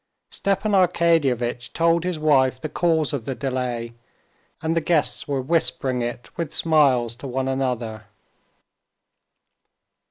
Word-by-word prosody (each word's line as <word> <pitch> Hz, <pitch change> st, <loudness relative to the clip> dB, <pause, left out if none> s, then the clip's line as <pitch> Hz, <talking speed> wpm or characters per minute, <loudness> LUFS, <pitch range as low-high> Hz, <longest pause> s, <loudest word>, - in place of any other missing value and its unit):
Stepan 200 Hz, +2 st, -1 dB
Arkadyevitch 165 Hz, -, +2 dB
told 165 Hz, 0 st, +2 dB
his 180 Hz, -2 st, -1 dB
wife 135 Hz, -4 st, +3 dB
the 155 Hz, -, -4 dB
cause 160 Hz, -2 st, +1 dB
of 130 Hz, -6 st, -3 dB
the 135 Hz, -, -3 dB
delay, 125 Hz, -3 st, -3 dB, 0.7 s
and 160 Hz, +1 st, -1 dB
the 165 Hz, -, +2 dB
guests 155 Hz, -2 st, 0 dB
were 140 Hz, -2 st, -1 dB
whispering 135 Hz, -4 st, 0 dB
it 120 Hz, +1 st, -5 dB
with 170 Hz, -4 st, -3 dB
smiles 135 Hz, -8 st, +3 dB
to 125 Hz, +3 st, -8 dB
one 130 Hz, +1 st, -2 dB
another. 125 Hz, -5 st, -2 dB
135 Hz, 125 wpm, -23 LUFS, 125-165 Hz, 0.7 s, wife